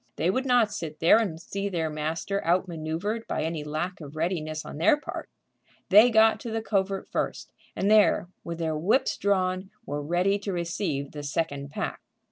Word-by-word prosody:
They 170 +4 +1
would 260 +6 -1
not 240 -5 +4
sit 155 -2 -6
there 170 +7 +6
and 185 -8 -2
see 200 +3 -4
their 165 -4 -1
master 160 +6 -2
outmanoeuvred 175 +5 -1
by - - -1
any 160 -1 -2
lack 165 +5 -3
of 145 0 -9
readiness 155 -2 -2
on 145 - -7
their 175 - +5
part. - - -7 0.6
They 210 +5 +8
got 220 -1 +5
to 235 - -6
the 225 0 -2
covert 195 -2 -1
first, - - -3 0.2
and 200 +2 +1
there, 210 -4 +5 0.2
with 170 -1 -5
their 160 -2 -1
whips 185 - +2
drawn, 185 -1 0 0.2
were 145 -4 -3
ready 180 +6 +1
to 200 0 -4
receive 170 -5 -2
the 150 - -7
second 145 -1 -2
pack. - - -4
175 Hz, 180 wpm, -27 LUFS, 155-200 Hz, 0.6 s, They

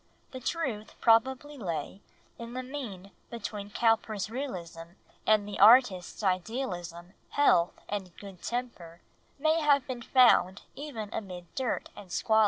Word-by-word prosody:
The 260 - -7
truth 250 -7 -3
probably 265 +5 +2
lay 170 -1 -4 0.4
in 235 0 -7
the 255 0 -4
mean 230 -9 -7 0.2
between 210 -3 -6
Cowper's 220 -2 +1
realism 175 -10 -6 0.3
and 215 -2 +4
the 205 - -6
artist's 215 -6 +5
idealism, 185 -3 -3 0.2
health 175 -12 +3
and 195 -3 -4
good 195 -3 -11
temper 210 -9 -5 0.4
may 315 +3 +2
have 285 -3 +4
been 250 -2 -5
found 230 -7 +4
even 245 -8 -6
amid 180 -4 -7
dirt 260 -3 -2
and 185 -3 -12
squalor. 220 +5 +2
220 Hz, 130 wpm, -29 LUFS, 185-255 Hz, 0.4 s, artist's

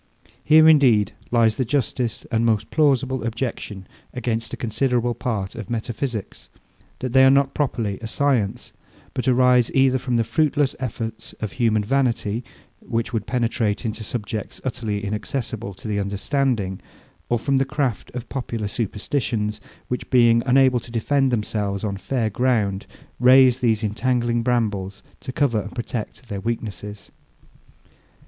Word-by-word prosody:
Here 155 +1 +7
indeed 130 -10 +5 0.2
lies 115 -2 +3
the 130 - +1
justest 125 -3 -1
and 115 -1 +2
most 110 -2 +1
plausible 135 -5 +2
objection 115 -4 -4 0.3
against 115 -2 -2
a - - -5
considerable 120 +1 0
part 105 -6 -3
of - - -8
metaphysics, 115 -1 -4 0.5
that 130 -2 -4
they 130 0 +7
are 135 - +8
not 140 0 +3
properly 115 -9 -1
a 115 - -5
science; 125 -5 0 0.4
but 125 0 -3
arise 125 -1 +4
either 135 -1 +4
from 125 -1 -2
the 115 - +3
fruitless 145 +3 +1
efforts 115 -3 -5
of 105 -3 -5
human 110 -4 +1
vanity, 120 -2 0 0.4
which 115 +1 -3
would 110 -2 -2
penetrate 115 -3 0
into 110 0 -3
subjects 105 -1 -5
utterly 110 -5 -3
inaccessible 105 0 -4
to 100 - -10
the 105 -1 -1
understanding, 100 0 -1 0.5
or 120 - +2
from 135 +4 +1
the 135 - +3
craft 135 -6 -2
of 125 -1 -5
popular 115 -5 -3
superstitions, 105 0 -2 0.3
which, 125 - -4
being 120 -2 +5
unable 130 -1 +5
to 120 - -13
defend 135 +4 +1
themselves 105 -3 -2
on 100 -2 -1
fair 110 +2 -1
ground, 105 -5 0 0.3
raise 130 0 +6
these 115 -3 +1
intangling 120 +2 0
brambles 105 -5 -1 0.2
to - - -6
cover 125 -5 +1
and 105 - -9
protect 120 0 -5
their 100 -3 -4
weakness. 105 -2 -5
120 Hz, 145 wpm, -22 LUFS, 105-130 Hz, 0.5 s, are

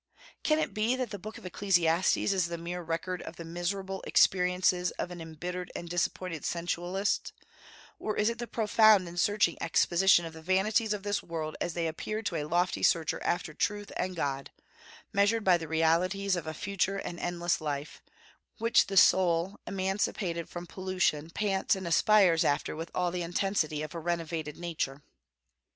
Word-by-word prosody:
Can 305 - +2
it 315 - -1
be 220 +3 +1
that 255 -4 -3
the 205 - -5
book 215 +4 -8
of - - -13
Ecclesiastes 175 -2 +2
is 190 -4 +1
the 170 0 -4
mere 175 +2 -5
record 170 +2 -3
of 160 - -8
the 170 - -8
miserable 190 +3 -3
experiences 180 -1 +3
of 180 - -3
an 175 -1 -7
embittered 175 +3 -6
and 175 - -5
disappointed 175 -1 -2
sensualist, 175 +3 -1 0.7
or 215 - -3
is 210 - +2
it 235 0 -1
the 240 - -4
profound 215 -4 +4
and 175 +1 -5
searching 205 -3 +2
exposition 175 +2 +4
of 165 - -7
the 160 - -11
vanities 200 +5 +1
of 205 -1 -5
this 205 0 -1
world 160 -2 -5
as 170 - -2
they 170 -1 -1
appear 215 +7 -3
to 185 - -2
a 150 - -2
lofty 175 +4 0
searcher 165 -2 +2
after 175 -3 -1
truth 205 +4 -2
and 185 0 -2
God, 140 -4 -2 0.6
measured 205 +3 +3
by 185 -3 +5
the 165 -2 -4
realities 175 +5 +2
of 170 -3 -5
a 155 - -3
future 195 +1 -1
and 175 -3 -5
endless 175 -1 -1
life, 145 -1 -4 0.6
which 230 +1 +3
the 195 0 -2
soul 180 0 +4
emancipated 190 -3 -2
from 175 0 -7
pollution 185 -4 -1
pants 195 +2 0
and 190 -2 -5
aspires 170 0 +4
after 145 +1 0
with 165 +2 -6
all 180 -1 +1
the 180 0 -3
intensity 170 -3 -1
of 155 - -7
a 170 - -4
renovated 165 -2 -3
nature? 150 -5 -4
175 Hz, 175 wpm, -30 LUFS, 165-195 Hz, 0.7 s, by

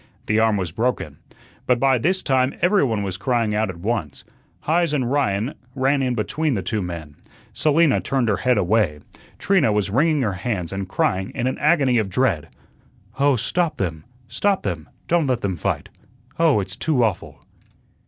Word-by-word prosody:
The 110 +1 +1
arm 110 -2 +3
was 90 -4 -3
broken. 120 +8 -2 0.5
But 125 -1 +3
by 135 -1 +3
this 185 +9 0
time 130 -1 +1
every 190 +1 +3
one 110 -6 0
was 95 -2 -4
crying 115 -1 0
out 110 0 0
at 90 - -6
once. 95 -6 -3 0.4
Heise 165 0 +1
and 130 -4 0
Ryan 125 -3 0 0.2
ran 135 +1 +2
in 125 -2 0
between 145 +6 -1
the 95 - -2
two 110 - -2
men. 80 -5 -7 0.4
Selina 150 +2 +3
turned 130 -3 0
her 105 -3 +1
head 125 +5 +2
away. 95 -6 +1 0.4
Trina 190 - +2
was 105 -2 0
wringing 150 +4 +2
her 105 -4 0
hands 90 -2 -3
and 95 -1 -4
crying 95 0 0
in 120 - -1
an 130 - -1
agony 140 -6 +3
of 105 -3 -1
dread: 100 - 0 0.7
"Oh, 140 -1 +4
stop 155 +7 -1
them, 80 -5 -3 0.2
stop 200 +6 0
them! 85 -5 -4 0.2
Don't 170 -3 +2
let 125 -2 0
them 95 -2 -1
fight. 80 - -3 0.5
Oh, 160 -9 +4
it's 95 +1 -6
too 135 0 +1
awful." 105 -6 -3
120 Hz, 180 wpm, -22 LUFS, 95-140 Hz, 0.7 s, Oh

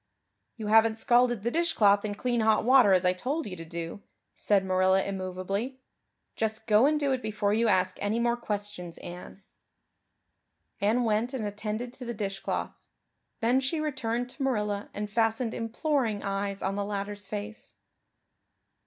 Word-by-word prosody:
"You 220 - -5
haven't 220 +1 +4
scalded 240 -2 +3
the 235 - 0
dishcloth 215 -12 +3
in 205 -1 -3
clean 240 +2 0
hot 220 -1 +3
water 255 -5 +6
as 185 -1 +4
I 180 - +4
told 275 - -3
you 185 - -6
to 165 - -8
do," 170 +3 -6 0.3
said 200 -2 +1
Marilla 185 +1 +3
immovably. 195 +6 -3 0.6
"Just 220 0 -2
go 215 +4 +5
and 305 0 +2
do 285 -2 +1
it 260 -1 0
before 210 -2 0
you 230 +2 +2
ask 185 -2 +2
any 205 +3 0
more 235 0 +2
questions, 205 -6 -5
Anne." 180 +2 -10 1.4
Anne 220 +4 +2
went 230 +3 0
and 225 -5 -3
attended 215 +4 -4
to 255 -1 -8
the 235 0 -4
dishcloth. 195 -2 -3 0.7
Then 240 +3 +3
she 270 +5 -1
returned 250 -5 -2
to 285 - -11
Marilla 210 -6 -1
and 210 +1 -4
fastened 225 +2 0
imploring 230 -2 -1
eyes 200 0 -2
of 195 +1 -1
the 205 - -1
latter's 205 0 -4
face. 210 +1 -7
215 Hz, 160 wpm, -28 LUFS, 200-240 Hz, 1.4 s, water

